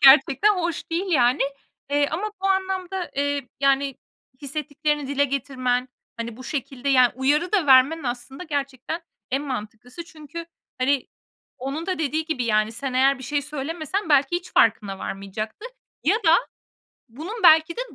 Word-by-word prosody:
gerçekten 270 +8 +6
hoş 340 -3 -3
değil, 345 +4 -1
yani, 255 -3 +3 0.5
eee, 285 0 +2
ama 405 +7 -2
bu 390 - +1
anlamda, 380 -1 -1
eee, 285 -2 -1
yani, 275 0 +2 0.5
hissettiklerini 295 0 -2
dile 285 0 +2
getirmen, 255 -2 -1 0.3
hani, 230 -1 -5
bu 255 - -10
şekilde, 270 -1 -4
yani, 255 -3 +5
uyarı 290 - +1
da 380 -7 +2
vermen 275 +5 +6
aslında 260 +5 -5
gerçekten 285 0 -3 0.3
en 270 +2 0
mantıklısı. 245 +3 -6
Çünkü, 330 0 -9 0.3
hani, 265 +1 +1 0.5
onun 275 +7 -4
da 370 -2 -1
dediği 315 +1 -1
gibi, 310 -6 -2
yani, 215 -1 +2
sen 265 +3 -4
eğer 265 +2 +3
bir 265 - -10
şey 290 +2 -1
söylemesen 310 +6 -4
belki 285 +2 +4
hiç 355 - -8
farkına 205 -3 +3
varmayacaktı 215 - -5 0.4
ya 375 +8 +4
da 345 -7 +5 0.7
bunun 360 - -7
belki 320 0 +6
de - - -1
280 Hz, 150 wpm, -24 LUFS, 255-325 Hz, 0.7 s, gerçekten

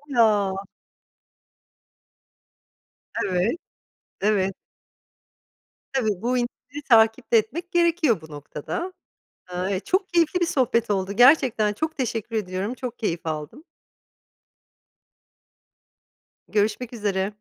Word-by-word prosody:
Ya! 200 -4 +3 2.6
Evet, 185 - +1 0.7
evet. 195 -2 +2 1.4
Tabii, 215 -8 0
bu 250 +2 +1
indirimi 255 +4 -5
takip 225 +1 +4
de 230 - +7
etmek 310 - -2
gerekiyor 335 - +2
bu 155 -1 -13
noktada. 150 - -5 0.6
Eee, 185 +1 -1
çok 375 - 0
keyifli 345 0 +2
bir 345 - +3
sohbet 245 -8 +1
oldu 195 0 0
gerçekten, 245 -3 +5
çok 315 +9 -3
teşekkür 230 -3 -2
ediyorum, 195 +2 -2
çok 250 -2 -6
keyif 170 -6 -2
aldım. 155 - -5 2.9
Görüşmek 215 +3 0
üzere. 205 -3 -1
220 Hz, 95 wpm, -24 LUFS, 195-260 Hz, 2.9 s, de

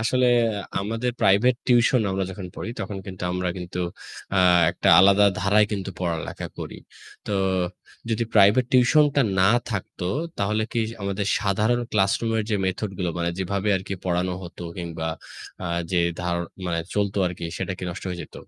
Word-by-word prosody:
আসলে 125 +3 +2 0.5
আমাদের 115 +5 -2
private 110 +6 +4
tuition 125 +1 +4
আমরা 95 0 -1
যখন 95 0 -7
পড়ি - - -5
তখন 95 0 -4
কিন্তু 95 -2 -8
আমরা 90 0 -1
কিন্তু 90 0 -6 0.6
আ - - +4 0.3
একটা 85 - -1
আলাদা 100 +2 +6 0.2
ধারায় 105 +2 +4
কিন্তু 95 -1 -3
পড়ালেখা 85 -3 -3
করি। - - -6 0.5
তো - - -3 0.8
যদি 115 +1 +1
প্রাইভেট 105 +4 +6
টিউশনটা 140 +3 +4 0.2
না 95 - +5 0.2
থাকতো 95 -3 -4 0.3
তাহলে 105 +2 +1
কি 120 - +1 0.2
আমাদের 100 0 -2
সাধারণ 105 +4 +1
ক্লাসরুমের 110 +2 +1
যে 105 - +2
মেথড 95 +2 -2
গুলো 90 -2 -1
মানে 85 0 0
যেভাবে 100 +2 -1
আরকি 95 +1 -5
পড়ানো 90 0 0
হতো 90 0 -9
কিংবা 85 -2 -4 0.6
আ - - -2 0.2
যে 90 - +2 0.2
ধার 90 -1 -1 0.6
চলত 100 -1 0
আরকি 90 -1 -5
সেটা 95 0 -2
কি - - -5
নষ্ট 90 +2 -8
হয়ে 90 -1 -5
যেত? - - -20
100 Hz, 155 wpm, -24 LUFS, 90-110 Hz, 0.8 s, আলাদা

